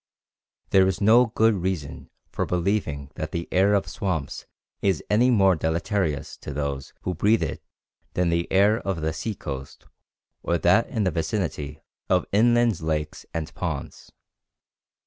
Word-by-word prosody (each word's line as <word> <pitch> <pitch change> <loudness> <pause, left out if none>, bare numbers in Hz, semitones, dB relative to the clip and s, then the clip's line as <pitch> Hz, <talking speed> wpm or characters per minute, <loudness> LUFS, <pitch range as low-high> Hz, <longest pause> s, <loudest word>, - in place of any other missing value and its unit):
There 95 -1 +6
is 95 - -1
no 115 +4 +6
good 110 0 +3
reason 90 -6 -4 0.2
for - - -2
believing 85 -6 -1
that 80 0 -5
the 85 0 -3
air 100 +3 +4
of 100 - 0
swamps 85 -9 -3 0.3
is 95 -5 +1
any 120 +4 +4
more 95 -6 +4
deleterious 80 -1 -1
to - - -8
those 70 -1 -3
who 90 - -2
breathe 105 +7 +2
it - - -4 0.5
than 90 -1 +2
the 85 0 -1
air 105 +4 +4
of 95 -7 -3
the 80 +1 -1
sea 90 +8 -4
coast 70 -5 -7 0.6
or 85 - 0
that 90 +7 +3
in 110 -5 -1
the 95 - +1
vicinity 80 -4 -3 0.3
of 90 -1 +3
inland 120 -2 +3
lakes 75 -1 -3
and 80 -2 -4
ponds. - - -5
90 Hz, 150 wpm, -25 LUFS, 80-105 Hz, 0.6 s, There